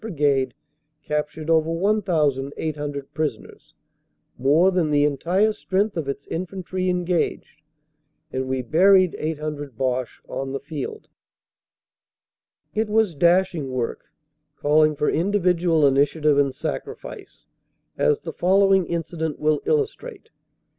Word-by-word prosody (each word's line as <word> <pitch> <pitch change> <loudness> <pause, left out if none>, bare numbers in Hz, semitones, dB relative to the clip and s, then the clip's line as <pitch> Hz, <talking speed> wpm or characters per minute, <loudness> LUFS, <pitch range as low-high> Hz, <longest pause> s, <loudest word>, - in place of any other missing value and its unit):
Brigade 145 -10 0 0.5
captured 150 +1 -3
over 160 -1 +3
1,800 150 -6 -1
prisoners, 150 -8 -5 0.6
more 155 +8 +3
than 175 -4 +1
the 145 -1 +3
entire 175 +9 +1
strength 200 +1 -1
of 155 -5 -3
its 140 0 -5
infantry 185 +1 -3
engaged, 180 -4 -1 0.7
and 130 0 -2
we 130 -1 -2
buried 185 +6 +4
800 150 -4 -4
Boche 130 -1 -2
on 135 0 -4
the 135 - -2
field. 155 - -6 1.7
It 215 0 -1
was 215 -4 +2
dashing 170 -1 +2
work, 125 -2 -3 0.5
calling 155 +1 +3
for 150 - -1
individual 175 -4 +2
initiative 145 +2 +3
and 140 -2 +1
sacrifice, - - -7 0.5
as 450 -2 +1
the - - -6
following 195 0 +3
incident 165 -2 -3
will 150 -1 +1
illustrate. 450 0 -2
160 Hz, 110 wpm, -23 LUFS, 145-185 Hz, 1.7 s, buried